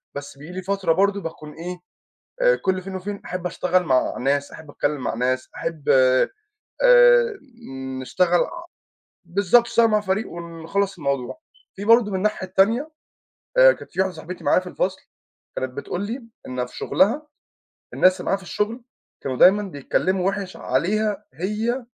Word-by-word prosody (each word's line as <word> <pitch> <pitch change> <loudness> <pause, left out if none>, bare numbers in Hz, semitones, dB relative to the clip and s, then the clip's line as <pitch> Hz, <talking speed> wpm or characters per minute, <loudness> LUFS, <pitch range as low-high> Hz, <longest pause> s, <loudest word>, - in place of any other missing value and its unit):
بس 140 -1 -7
بييجي 150 +5 -10
لي 185 - -4
فترة 195 -2 0
برضه 200 +2 +1
باكون 155 -3 -8
إيه؟ 180 +2 -6 0.7
آآ، - - +5
كل 185 -1 -1
فين 190 0 -6
وفين 200 +2 -5
أحب 180 0 -5
أشتغل 180 +1 +1
مع 130 -5 +1
ناس، 140 +2 0
أحب 160 -2 -11
أتكلّم 145 0 -2
مع - - -2
ناس، 130 +2 -1
أحب، 160 -4 -5
آآ 130 -1 +5 1.7
نشتغل 175 +6 +2
ع 340 0 -3 0.6
بالضبط، 200 +6 +4
نشتعل 235 -1 +4
مع 215 -1 +2
فريق 200 +2 -1
ونخلص 170 +3 -3
الموضوع. 140 - -3 0.4
فيه 200 +1 -6
برضه 230 -2 +5
من 190 - -1
الناحية 200 -1 -1
التانية، 225 +11 +2 0.7
آآ، - - +9
كانت - - -13
فيه - - +1
واحدة 190 -1 -1
صاحبتي 170 +3 -8
معايا - - +4
في 185 - -10
الفصل، 185 +1 -2 0.6
كانت 130 -1 -3
بتقول 175 +5 -4
لي 240 +4 -5 0.2
إن 125 -1 -3
في 125 - -13
شغلها 290 +11 +1 0.7
الناس 185 0 +4
اللي - - -7
معاها - - +2
في - - -16
الشغل 220 +6 -2 0.4
كانوا 130 -2 -3
دايمًا 200 +3 +6
بيتكلّموا 185 +2 -1
وِحِش 195 -1 -4
عليها 205 +9 -1
هي 215 - -2
185 Hz, 160 wpm, -23 LUFS, 160-205 Hz, 1.7 s, آآ